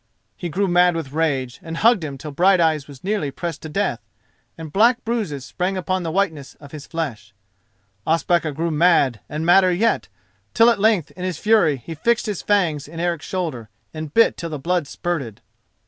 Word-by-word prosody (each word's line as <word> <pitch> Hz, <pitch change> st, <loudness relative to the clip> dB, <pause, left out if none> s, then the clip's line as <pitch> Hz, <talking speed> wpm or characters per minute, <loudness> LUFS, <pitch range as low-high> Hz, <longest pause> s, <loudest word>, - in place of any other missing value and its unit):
He 175 Hz, -, -5 dB
grew 195 Hz, +5 st, 0 dB
mad 175 Hz, -1 st, +4 dB
with 160 Hz, -5 st, -4 dB
rage, 140 Hz, -5 st, -1 dB
and 165 Hz, 0 st, -6 dB
hugged 225 Hz, -4 st, +4 dB
him 140 Hz, -3 st, -5 dB
till 150 Hz, +2 st, -8 dB
Brighteyes 165 Hz, -3 st, +3 dB
was 140 Hz, -3 st, -13 dB
nearly 200 Hz, -6 st, -1 dB
pressed 165 Hz, +3 st, -5 dB
to 155 Hz, -, -7 dB
death, 200 Hz, +7 st, -1 dB, 0.6 s
and 160 Hz, -2 st, -9 dB
black 235 Hz, +4 st, +3 dB
bruises 200 Hz, -, -2 dB
sprang 180 Hz, +9 st, -2 dB
upon 185 Hz, +1 st, -1 dB
the 165 Hz, -2 st, -3 dB
whiteness 160 Hz, -7 st, -2 dB
of 145 Hz, -2 st, -14 dB
his 150 Hz, -2 st, -9 dB
flesh. 120 Hz, -, -5 dB, 0.7 s
Ospakar 165 Hz, 0 st, +1 dB
grew 165 Hz, +4 st, -2 dB
mad, 150 Hz, -7 st, +3 dB
and 155 Hz, +2 st, -3 dB
madder 185 Hz, +1 st, +5 dB
yet, 220 Hz, +6 st, +1 dB, 0.5 s
till 230 Hz, +1 st, +6 dB
at 230 Hz, -, -1 dB
length 205 Hz, -7 st, +2 dB
in 180 Hz, -, -9 dB
his 185 Hz, -4 st, -2 dB
fury 200 Hz, -10 st, +3 dB
he 165 Hz, -, -5 dB
fixed 230 Hz, +9 st, 0 dB
his 210 Hz, -4 st, -3 dB
fangs 170 Hz, -9 st, +1 dB
in 165 Hz, +2 st, -9 dB
Eric's 170 Hz, -2 st, -2 dB
shoulder 155 Hz, -, -4 dB, 0.2 s
and 155 Hz, -2 st, -6 dB
bit 230 Hz, +8 st, +4 dB
till 170 Hz, -, -5 dB
the 155 Hz, -, -4 dB
blood 170 Hz, +2 st, -1 dB
spurted. 140 Hz, -11 st, -4 dB
165 Hz, 190 wpm, -21 LUFS, 150-185 Hz, 0.7 s, till